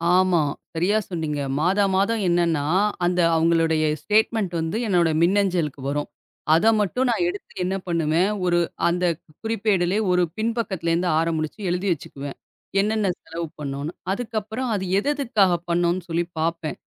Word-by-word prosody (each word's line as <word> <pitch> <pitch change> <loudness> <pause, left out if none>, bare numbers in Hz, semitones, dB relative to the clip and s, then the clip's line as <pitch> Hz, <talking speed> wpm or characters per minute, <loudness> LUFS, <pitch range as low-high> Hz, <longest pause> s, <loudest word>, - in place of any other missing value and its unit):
ஆமா. 185 -2 +4 0.3
சரியா 180 +6 +2
சொன்னீங்க. 160 -5 -3 0.2
மாதா 190 +5 +3
மாதம் 210 +4 +1
என்னன்னா, 170 -4 +1 0.4
அந்த 180 0 +1 0.2
அவுங்களுடைய 165 -1 +2 0.2
ஸ்டேட்மெண்ட் 215 -3 +1
வந்து 165 +6 -2
என்னோட 175 -4 +3
மின்னஞ்சலுக்கு 175 -6 +1
வரும். 145 +1 -2 0.5
அத 190 +7 +3
மட்டும் 250 +6 0
நான் 245 +9 +1
எடுத்து 390 +3 -8
என்ன 185 +2 -1
பண்ணுவேன்? 170 +2 +1 0.2
ஒரு 175 -1 +3 0.3
அந்தக் 175 -2 0 0.2
குறிப்பேடுலயே 205 -3 +1
ஒரு 180 0 +3
பின் 225 +1 0
பக்கத்துல 190 -7 -1
இருந்து 175 +2 +1
ஆரம்பிச்சு 160 +2 -2
எழுதி 180 +3 -1
வச்சுக்குவேன். 140 -2 -8 0.4
என்னென்ன 215 0 0 0.2
செலவு 165 +1 -5
பண்ணோம்னு. 140 +2 -4 0.2
அதுக்கப்புறம், 220 +2 -3
அது 190 -2 -2
எதெதுக்காகப் 215 - +1
பண்ணோம்னு 175 +1 +1
சொல்லி 170 +1 +1 0.2
பாப்பேன். 165 -1 -2
175 Hz, 135 wpm, -23 LUFS, 165-205 Hz, 0.5 s, ஆமா